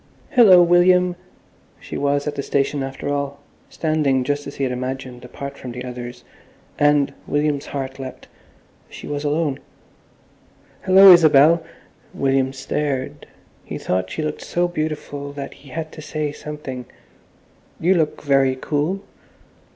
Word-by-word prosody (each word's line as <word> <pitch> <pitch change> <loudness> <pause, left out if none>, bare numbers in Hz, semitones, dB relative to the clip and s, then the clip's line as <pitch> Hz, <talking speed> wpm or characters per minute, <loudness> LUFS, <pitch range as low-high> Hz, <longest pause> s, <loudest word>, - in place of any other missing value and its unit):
"Hillo, 190 -8 +7
William!" 180 +1 +4 0.6
She - - -9
was 145 0 0
at 150 - -2
the 140 - -3
station 140 +1 0
after 135 +1 -5
all, 140 0 -2 0.3
standing 150 -5 0
just 145 +2 -2
as 140 - -8
he 140 - -3
had 130 -1 0
imagined, 130 0 -5
apart 140 +3 -8
from 125 -2 -7
the 125 +1 -6
others, 125 0 -8 0.6
and—William's 145 0 +1
heart 135 -1 -5
leapt—she 130 -1 -13
was 145 0 -4
alone. 150 -1 0 1.2
"Hallo, 190 +1 +8
Isabel!" 160 0 +6 0.5
William 135 -1 +1
stared. 135 0 -3 0.4
He - - -6
thought 95 0 -2
she 95 - -4
looked 150 0 -4
so 175 0 0
beautiful 150 -3 -4
that 140 -1 -7
he 140 - -17
had 155 +3 -5
to 155 - -10
say 150 -1 -3
something, 145 -4 -7 0.9
"You 180 +3 +3
look 160 -4 -1
very 135 -2 +3
cool." 155 +8 -1
145 Hz, 135 wpm, -21 LUFS, 135-155 Hz, 1.2 s, Hallo